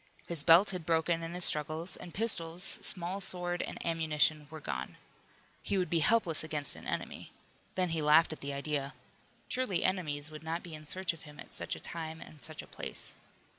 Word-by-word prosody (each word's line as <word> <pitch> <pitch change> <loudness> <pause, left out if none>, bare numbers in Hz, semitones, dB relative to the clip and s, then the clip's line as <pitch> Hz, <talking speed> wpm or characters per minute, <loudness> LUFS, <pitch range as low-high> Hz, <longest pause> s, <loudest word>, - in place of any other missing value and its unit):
His 165 -4 +1
belt 175 +5 +7
had 180 -3 -4
broken 165 +1 +2
in 165 +1 -5
his 180 - +1
struggles, 155 +4 -1
and 175 - -9
pistols, 180 -4 +3
small 185 +2 0
sword 175 -1 -1
and - - -4
ammunition 155 -2 +2
were 155 0 -7
gone. 65 - -4 0.6
He 200 - 0
would 180 -1 0
be 170 - +4
helpless 170 -3 +3
against 150 -2 +2
an - - -10
enemy. - - -4 0.4
Then 185 -1 +2
he 165 -1 0
laughed 155 +2 +6
at - - -9
the 140 - -4
idea. 140 0 -2 0.5
Surely 250 -8 0
enemies 155 -5 0
would 155 - -8
not 165 +2 -3
be 170 - -8
in 155 0 -9
search 185 0 -1
of 165 - -13
him 150 -1 -13
at - - -10
such - - -3
a - - -8
time 160 -1 -5
and 150 -3 -12
such 155 0 -7
a - - -14
place. - - -6
165 Hz, 200 wpm, -32 LUFS, 155-175 Hz, 0.6 s, belt